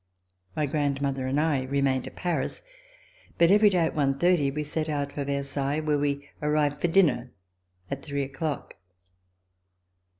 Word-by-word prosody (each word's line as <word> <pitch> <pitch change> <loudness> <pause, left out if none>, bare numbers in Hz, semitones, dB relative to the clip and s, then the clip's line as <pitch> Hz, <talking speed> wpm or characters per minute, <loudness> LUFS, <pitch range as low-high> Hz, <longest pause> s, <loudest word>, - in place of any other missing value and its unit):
My 155 - +1
grandmother 140 -2 -1
and 135 +3 +1
I 150 -4 +1
remained 135 -1 0
at - - -10
Paris, 175 -2 -2 0.7
but 170 +1 +5
every 210 +1 +6
day 180 -4 +2
at - - -2
one 135 -2 +1
thirty 175 -4 +3
we 150 +2 -3
set 155 +1 -3
out 145 -1 -2
for 145 - -3
Versailles 140 +1 -1
where 150 -2 0
we 140 0 -1
arrived 150 -1 +1
for - - +3
dinner 165 -9 +3 0.6
at 140 0 -3
three 140 -1 -2
o'clock. 135 -3 -4
145 Hz, 155 wpm, -27 LUFS, 140-155 Hz, 0.7 s, every